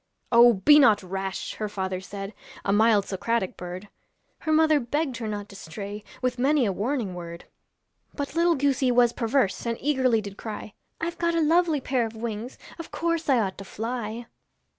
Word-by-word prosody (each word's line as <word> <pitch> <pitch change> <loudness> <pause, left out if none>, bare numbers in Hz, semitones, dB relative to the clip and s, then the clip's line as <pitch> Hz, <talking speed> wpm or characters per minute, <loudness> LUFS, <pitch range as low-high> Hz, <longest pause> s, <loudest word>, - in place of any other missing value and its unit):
'Oh! 240 0 +8
be 260 +10 +6
not 215 -8 +5
rash,' 190 +1 -4
her 215 -1 -4
father 190 -2 -3
said, 195 +2 -7 0.3
A 200 - +2
mild 215 -1 +4
Socratic 200 0 -1
bird; 180 +3 -7 0.5
Her 315 - -2
mother 310 -1 +4
begged 275 +1 -2
her 225 - -4
not 205 -1 -4
to 200 - -12
stray 200 +4 -7 0.2
With 250 -1 0
many 275 0 +3
a 200 - +1
warning 215 0 -2
word. 170 -1 -8 0.7
But 285 -1 -4
little 335 +1 +3
goosey 275 -2 +1
was 240 -1 +4
perverse, 235 -3 0
And 230 -1 -1
eagerly 260 -5 +2
did 200 -1 -8
cry, 215 -2 -7 0.3
I've 340 +1 -4
got 340 0 +1
a - - +2
lovely 325 -1 +3
pair 250 -3 0
of 225 - -11
wings, 225 +2 -5 0.2
Of 330 - -7
course 335 -2 -1
I 265 - +5
ought 190 -2 -3
to - - -6
fly.' 230 +2 -5
230 Hz, 185 wpm, -26 LUFS, 200-280 Hz, 0.7 s, Oh